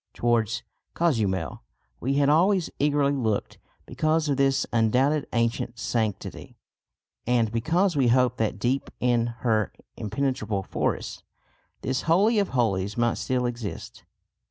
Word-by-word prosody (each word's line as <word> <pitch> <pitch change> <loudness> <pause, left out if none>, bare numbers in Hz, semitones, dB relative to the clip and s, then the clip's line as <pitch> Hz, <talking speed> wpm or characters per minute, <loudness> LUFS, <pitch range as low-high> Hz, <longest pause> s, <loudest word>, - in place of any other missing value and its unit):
Towards 115 -1 +1 0.3
Cozumel 100 - 0 0.4
we 135 +2 -1
had 140 0 +3
always 175 +4 +3
eagerly 145 -1 +2
looked 115 -7 -2 0.3
because 155 0 0
of 140 - +2
this 135 -1 +2
undoubted 130 +6 +2
ancient 115 0 -1
sanctity, 110 -3 -3 0.7
and 120 -3 +2
because 165 - +1
we 135 -3 +3
hoped 125 0 +3
that 110 -1 0
deep 130 +3 -1
in 120 -1 +2 0.2
her 110 -3 +2 0.3
impenetrable 110 -3 -2
forests, - - -2 0.6
this 130 0 -1
Holy 210 +7 +4
of 200 - +1
Holies 105 -5 0
might 120 -1 +1
still 125 -1 0
exist. 120 -4 -5
125 Hz, 125 wpm, -26 LUFS, 115-145 Hz, 0.7 s, Holy